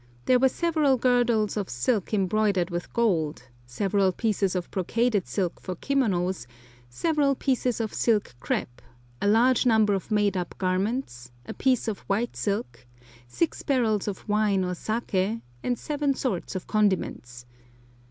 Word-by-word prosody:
There 255 -1 +4
were 265 +1 +5
several 310 -3 +2
girdles 240 -4 +2
of 205 -3 -3
silk 175 - -1
embroidered 195 -2 +1
with 175 0 -4
gold, 160 - 0 0.2
several 195 +8 +1
pieces 200 -2 0
of 180 -1 -3
brocaded 210 +2 0
silk 185 -4 -2
for 185 - -5
kimonos, 185 - 0 0.4
several 285 - +1
pieces 255 -3 0
of 220 -2 -2
silk 215 - +1
crêpe, 120 +1 -3 0.4
a - - +1
large 235 +4 +4
number 220 -3 +4
of 195 - -3
made 205 -2 +2
up 180 -2 -4
garments, 185 - -2
a - - -6
piece 255 -3 +1
of 215 -3 -2
white 220 +5 0
silk, 130 - -3 0.4
six 325 - -1
barrels 225 -7 +1
of 200 -3 -5
wine 210 -2 +2
or 180 - -2
saké, 215 +1 -2 0.2
and 245 -1 -1
seven 290 0 -1
sorts 200 -9 -3
of 185 - -4
condiments. 185 - -1
210 Hz, 145 wpm, -26 LUFS, 185-240 Hz, 0.4 s, were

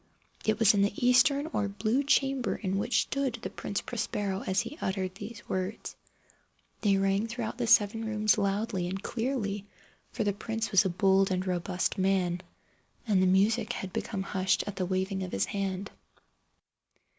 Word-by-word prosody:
It 215 0 +2
was 220 -1 +5
in 200 - +2
the 205 +4 +1
eastern 280 +3 +4
or 205 - 0
blue 215 +6 0
chamber 270 -2 +1
in 195 -2 -2
which 230 +3 +2
stood 270 -3 -2
the - - -4
Prince 200 - -3
Prospero 205 -4 -3
as 190 +1 +2
he - - -7
uttered 190 -1 -2
these 205 +2 -9
words. 185 +3 -3 0.9
They 200 -3 +3
rang 195 +3 +1
throughout 235 0 -4
the 240 - 0
seven 225 -1 +4
rooms 215 -1 +2
loudly 200 -2 -1
and 190 +2 -4
clearly, 225 -5 -2 0.4
for 225 - -2
the 205 -1 +1
prince 225 +1 -3
was 195 0 +5
a - - +2
bold 190 +2 +3
and 185 0 -1
robust 180 0 -1
man, 185 -2 +1 0.6
and 205 -5 +3
the 185 - +4
music 215 +5 +2
had 190 -5 -6
become 195 -3 -3
hushed 190 -1 +1
at 205 - -5
the 185 -2 -1
waving 190 +1 -1
of 185 -1 -4
his - - +1
hand. 195 -1 -3
200 Hz, 170 wpm, -29 LUFS, 190-225 Hz, 0.9 s, was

